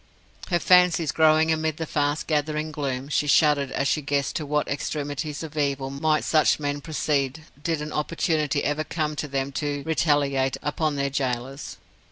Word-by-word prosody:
Her 175 Hz, -, +2 dB
fancies 175 Hz, -3 st, +4 dB
growing 160 Hz, 0 st, +4 dB
amid 160 Hz, -1 st, -1 dB
the 160 Hz, -, -3 dB
fast 145 Hz, 0 st, -1 dB
gathering 155 Hz, 0 st, -1 dB
gloom, 135 Hz, -3 st, -3 dB
she 150 Hz, 0 st, 0 dB
shuddered 145 Hz, -2 st, +4 dB
as 135 Hz, -, -1 dB
she 155 Hz, -, +1 dB
guessed 140 Hz, -1 st, -1 dB
to 155 Hz, -3 st, -5 dB
what 150 Hz, 0 st, 0 dB
extremities 145 Hz, +2 st, -3 dB
of 160 Hz, -1 st, -8 dB
evil 140 Hz, -2 st, -1 dB
might 150 Hz, +2 st, +1 dB
such 155 Hz, -1 st, +3 dB
men 145 Hz, -1 st, -2 dB
proceed 150 Hz, -1 st, -1 dB, 0.2 s
did 160 Hz, -2 st, -1 dB
an 150 Hz, -, -6 dB
opportunity 150 Hz, -1 st, 0 dB
ever 145 Hz, +1 st, 0 dB
come 155 Hz, 0 st, -2 dB
to 150 Hz, -, -3 dB
them 135 Hz, 0 st, -2 dB
to 145 Hz, -1 st, -2 dB
retaliate 145 Hz, -4 st, +1 dB
upon 150 Hz, 0 st, -1 dB
their 140 Hz, 0 st, -1 dB
gaolers. 135 Hz, 0 st, -3 dB
150 Hz, 170 wpm, -25 LUFS, 140-155 Hz, 0.2 s, fancies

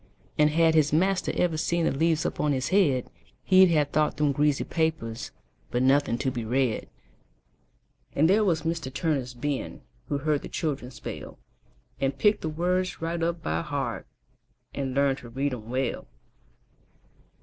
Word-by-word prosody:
And 150 Hz, 0 st, +4 dB
had 160 Hz, +1 st, +3 dB
his 155 Hz, -2 st, +3 dB
master 185 Hz, +5 st, +2 dB
ever 170 Hz, -3 st, +1 dB
seen 170 Hz, +1 st, 0 dB
The -, -, +2 dB
leaves 160 Hz, +3 st, +1 dB
up -, -, -3 dB
on 150 Hz, -1 st, +2 dB
his 130 Hz, -1 st, -1 dB
head, 150 Hz, -11 st, +2 dB, 0.4 s
He'd 190 Hz, 0 st, +6 dB
have 150 Hz, -4 st, +2 dB
thought 150 Hz, +1 st, +1 dB
them 150 Hz, -1 st, +2 dB
greasy 145 Hz, 0 st, +1 dB
papers, 160 Hz, -9 st, -2 dB, 0.4 s
But 120 Hz, +1 st, 0 dB
nothing 135 Hz, -3 st, +3 dB
to 130 Hz, +1 st, -1 dB
be 120 Hz, -2 st, -4 dB
read. 125 Hz, 0 st, 0 dB, 1.3 s
And 155 Hz, +3 st, +4 dB
there 205 Hz, +5 st, +4 dB
was 165 Hz, -6 st, +1 dB
Mr. 165 Hz, -5 st, -2 dB
Turner's 135 Hz, -4 st, -1 dB
Ben, 140 Hz, +2 st, -3 dB, 0.3 s
Who 145 Hz, -, -1 dB
heard 150 Hz, +1 st, 0 dB
the -, -, -8 dB
children 140 Hz, -6 st, -3 dB
spell, 125 Hz, -, -8 dB, 0.6 s
And 135 Hz, 0 st, -1 dB
picked 210 Hz, 0 st, +3 dB
the 160 Hz, -, -2 dB
words 180 Hz, +3 st, -1 dB
right 165 Hz, +1 st, -3 dB
up 170 Hz, 0 st, -1 dB
by 80 Hz, +1 st, -1 dB
heart, -, -, -3 dB, 0.7 s
And 135 Hz, -2 st, -3 dB
learned 140 Hz, -1 st, +2 dB
to 120 Hz, -, -11 dB
read 135 Hz, +3 st, -1 dB
'em 115 Hz, -2 st, -7 dB
well. 130 Hz, 0 st, -2 dB
150 Hz, 165 wpm, -27 LUFS, 130-165 Hz, 1.3 s, He'd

